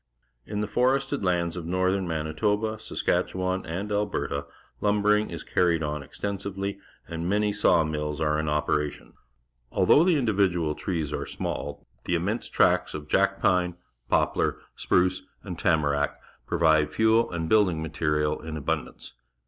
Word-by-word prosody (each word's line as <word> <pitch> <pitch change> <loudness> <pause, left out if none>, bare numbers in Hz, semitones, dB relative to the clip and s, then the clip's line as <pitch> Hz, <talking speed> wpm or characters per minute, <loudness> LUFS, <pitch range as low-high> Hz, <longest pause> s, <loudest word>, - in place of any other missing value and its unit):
In 105 0 -2
the 105 - -1
forested 135 +1 +1
lands 85 -2 0
of 85 -2 -5
northern 95 +1 +1
Manitoba, 105 +8 -1
Saskatchewan, 95 -2 -1
and 95 +6 -4
Alberta, 100 -8 -1 0.3
lumbering 105 +1 +2
is 85 -3 -6
carried 85 -3 +1
on 75 -1 -2
extensively, 100 +5 -4 0.3
and 85 +1 -4
jTiany_§aw 100 -6 +3
mill.s 75 -1 -3
are 75 -1 +1
in 75 -1 -1
operation. 75 0 -1 0.6
Although 150 - +5
the 175 -3 +3
individual 95 - +1
trees 80 -3 -3
are - - -3
small, - - -5 0.2
the 90 - +1
immense 100 +8 -2
tracts - - +2
of 75 -1 -7
jack - - +2
pine, 90 -1 +2 0.3
poplar, - - +1 0.2
sprucej^ujd^tama 90 -4 0
rn.ck - - -2 0.3
provide 80 -2 +3
fuel 110 +1 +3
and 85 -2 -3
l)uildiii£ 95 -5 +3
material 75 -1 -1
in 80 0 -6
abundance. 70 - -4
90 Hz, 130 wpm, -26 LUFS, 80-105 Hz, 0.6 s, Although